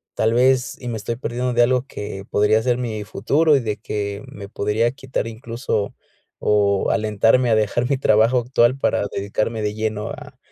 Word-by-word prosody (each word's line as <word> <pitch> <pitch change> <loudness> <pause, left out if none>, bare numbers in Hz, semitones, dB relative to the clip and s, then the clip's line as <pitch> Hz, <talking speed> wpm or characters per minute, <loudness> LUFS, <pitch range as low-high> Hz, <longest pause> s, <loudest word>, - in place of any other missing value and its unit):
tal 110 +1 +2
vez, 125 +1 +2
y 125 - -7
me 115 - -3
estoy 115 +2 -4
perdiendo 125 0 -2
de 120 0 +4
algo 125 +1 +1
que 100 -6 -7
podría 105 +2 +3
ser 125 0 +1
mi 110 -4 -3
futuro 145 - +2
y 135 - -1
de 110 -2 -2
que, 100 -1 -4
me 100 -1 -9
podría 110 +4 0
quitar 130 -3 -4
incluso 115 -2 -3 0.5
o 100 -2 +2
alentarme 110 +3 +2
a 110 - +5
dejar 110 +3 0
mi 140 - +2
trabajo 115 0 +3
actual 120 +1 +2
para 115 -6 0
dedicarme 110 +3 -2
de 105 0 -1
lleno 110 -1 -2
a - - -10
115 Hz, 185 wpm, -21 LUFS, 105-125 Hz, 0.5 s, a